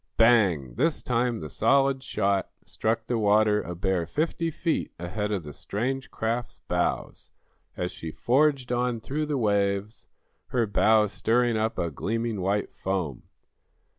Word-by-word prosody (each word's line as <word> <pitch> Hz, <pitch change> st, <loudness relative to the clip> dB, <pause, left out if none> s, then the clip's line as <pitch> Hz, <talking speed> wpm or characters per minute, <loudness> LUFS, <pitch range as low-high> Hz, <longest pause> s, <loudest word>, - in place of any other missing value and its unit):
Bang! 100 Hz, -, +4 dB
This 155 Hz, +4 st, +1 dB
time 120 Hz, -2 st, 0 dB
the 75 Hz, -, -5 dB
solid 135 Hz, -, +2 dB
shot 100 Hz, -7 st, 0 dB, 0.2 s
struck 110 Hz, 0 st, -1 dB
the 120 Hz, -1 st, -1 dB
water 105 Hz, 0 st, +4 dB
a 90 Hz, -, -6 dB
bare 90 Hz, -1 st, 0 dB
fifty 165 Hz, -, -1 dB
feet 165 Hz, +1 st, -1 dB
ahead 105 Hz, +5 st, -3 dB
of 100 Hz, -5 st, -1 dB
the 75 Hz, -1 st, -8 dB
strange 130 Hz, -, -3 dB
craft's 115 Hz, +2 st, -3 dB
bows -, -, -2 dB, 0.5 s
as 90 Hz, 0 st, -2 dB
she 80 Hz, -2 st, -7 dB
forged 130 Hz, -, +2 dB
on 125 Hz, -1 st, 0 dB
through 150 Hz, +6 st, -3 dB
the 145 Hz, -2 st, -1 dB
waves, 100 Hz, -2 st, 0 dB, 0.4 s
her 120 Hz, -2 st, +1 dB
bow 110 Hz, +1 st, +4 dB
stirring 115 Hz, +3 st, +1 dB
up 110 Hz, +1 st, -1 dB
a 85 Hz, -1 st, -1 dB
gleaming 115 Hz, +5 st, -2 dB
white 100 Hz, +2 st, -1 dB
foam. 90 Hz, -9 st, -3 dB
110 Hz, 145 wpm, -26 LUFS, 100-125 Hz, 0.5 s, Bang